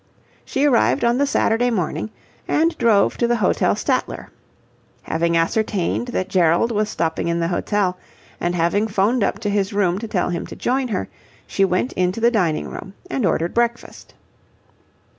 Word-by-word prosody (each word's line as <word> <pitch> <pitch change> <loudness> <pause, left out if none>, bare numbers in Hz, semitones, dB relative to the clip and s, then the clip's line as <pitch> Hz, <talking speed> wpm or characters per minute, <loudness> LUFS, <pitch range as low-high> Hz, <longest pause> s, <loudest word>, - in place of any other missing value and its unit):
She 275 +2 0
arrived 130 - +3
on 240 +2 +2
the 285 - +2
Saturday 245 -2 +2
morning 180 -4 -2 0.4
and 330 +2 +2
drove 215 -4 +3
to 235 - +2
the 240 - +2
Hotel 210 -5 +1
Statler. - - -2 0.7
Having 170 +1 0
ascertained 205 +5 0
that 190 -6 -2
Gerald 180 +4 +2
was 210 -1 0
stopping 165 -2 -2
in 170 0 0
the 165 0 0
hotel 185 0 -1 0.4
and 175 +1 -1
having 175 +6 +1
'phoned 210 +3 +1
up - - 0
to 205 - -1
his 200 0 0
room 190 -2 +1
to 225 - -5
tell 185 -5 -1
him 170 - -4
to - - -9
join 260 +1 0
her, 195 - -2 0.4
she 195 - 0
went 190 +6 0
into 185 +3 0
the 235 +1 +3
dining 175 -9 0
room 195 - -9 0.2
and 245 -8 +1
ordered 170 0 0
breakfast. 235 0 -2
200 Hz, 170 wpm, -21 LUFS, 175-235 Hz, 0.7 s, arrived